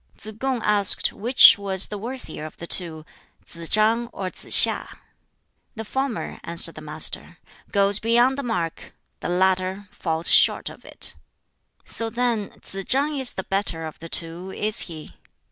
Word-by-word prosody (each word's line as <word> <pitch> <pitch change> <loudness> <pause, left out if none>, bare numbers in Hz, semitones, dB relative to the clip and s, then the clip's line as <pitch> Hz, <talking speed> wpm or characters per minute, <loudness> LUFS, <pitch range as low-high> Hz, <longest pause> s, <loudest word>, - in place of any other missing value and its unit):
Tsz 215 - -10
kung 260 -2 -2
asked 205 -2 +4
which 235 0 +6
was 195 -1 0
the 210 - -6
worthier 235 -9 -8
of 155 - -11
the 170 - -9
two 165 -3 +1 0.4
Tsz 170 -1 -9
chang 225 +3 +2
or 190 -5 -7
Tsz - - -3
hiŠ. - - +5 0.8
"The 220 0 -7
former," 265 +1 -4
answered 170 0 0
the 155 - -11
Master, 155 +3 -3 0.3
"goes 200 0 +3
beyond 240 +4 +2
the 280 - -4
mark; 175 - -5 0.3
the - - -5
latter 190 +2 -1
falls 160 -1 0
short - - +4
of - - -15
it." - - -4 0.7
"So 225 0 -1
then 235 -3 -2
Tsz 195 0 -6
chang 285 +3 0
is 260 -2 +3
the 190 - -5
better 195 -5 -3
of 155 - -10
the 165 - -10
two, 170 +3 -3
is 215 +3 -3
he?" 155 -2 -11
200 Hz, 160 wpm, -22 LUFS, 170-230 Hz, 0.8 s, which